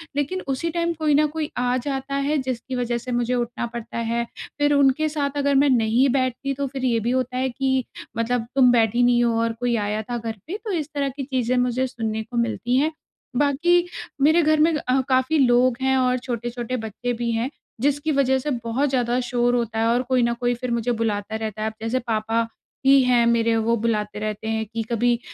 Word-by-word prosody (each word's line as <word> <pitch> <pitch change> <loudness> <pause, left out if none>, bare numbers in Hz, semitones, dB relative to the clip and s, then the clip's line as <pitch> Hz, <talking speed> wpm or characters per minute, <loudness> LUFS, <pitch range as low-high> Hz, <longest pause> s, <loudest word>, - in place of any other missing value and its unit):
लेकिन 330 +7 -1
उसी 275 +5 -1
टाइम 340 0 -1
कोई 305 -2 +2
न 305 +1 +4
कोई 305 0 -4
आ 250 0 +1
जाता 270 +1 -3
है, 285 +2 +1
जिसकी 260 0 -3
वजह 240 -1 -1
से 250 +1 -6
मुझे 240 +1 0
उठना 240 0 -2
पड़ता 235 0 -6
है। 235 +1 -1 0.3
फिर 290 0 +3
उनके 280 +2 +3
साथ 290 -1 -2
अगर 280 -1 +2
मैं 280 +1 +4
नहीं 240 +2 +3
बैठती, 260 +1 -1
तो 280 0 -2
फिर 260 0 -4
ये 230 -2 +2
भी 235 +3 -1
होता 255 0 -1
है 260 0 0
कि 265 0 0 0.3
मतलब, 230 0 0
"तुम 250 -2 +6
बैठी 235 0 +3
नहीं 240 0 +4
हो 235 -1 +2
और 230 0 0
कोई 245 -1 +1
आया 210 +1 -1
था 240 - -1
घर 225 -1 -4
पे।" 390 +5 -4
तो 425 - -3
इस 310 -4 -2
तरह 280 -1 0
की 275 - -3
चीज़ें 255 -2 -1
मुझे 250 +1 +1
सुनने 220 -2 -3
को 240 +2 -7
मिलती 235 +2 0
हैं। 305 +4 +2 0.5
बाकी 310 +5 +3 0.4
मेरे 315 +4 +5
घर 310 0 +3
में 320 +1 +4
अ, 265 -2 +1
काफ़ी 260 +4 +2
लोग 245 -1 +4
हैं 265 0 +2
और 255 0 +2
छोटे-छोटे 240 0 -4
बच्चे 225 +3 -4
भी 235 -1 0
हैं, 230 +3 -1 0.3
जिसकी 290 +2 +1
वजह 265 -2 +2
से 295 - -3
बहुत 255 +5 0
ज़्यादा 245 -1 +1
शोर 245 0 +2
होता 230 -2 -1
है 225 - +2
और 240 +2 +2
कोई 255 -2 +3
न 235 - +2
कोई 245 -1 +1
फिर 245 0 -4
मुझे 235 +1 0
बुलाता 210 0 -2
रहता 220 -1 -4
है। 220 - 0
अब - - -13
जैसे 225 +3 0
पापा 225 +1 0 0.4
भी 275 0 +7
हैं 245 -2 +3
मेरे, 230 -1 +2
वो 230 +1 +2
बुलाते 210 -2 -1
रहते 215 0 -4
हैं 220 0 -1
कि 230 - -1
कभी 240 +1 +2
245 Hz, 220 wpm, -23 LUFS, 230-275 Hz, 0.5 s, भी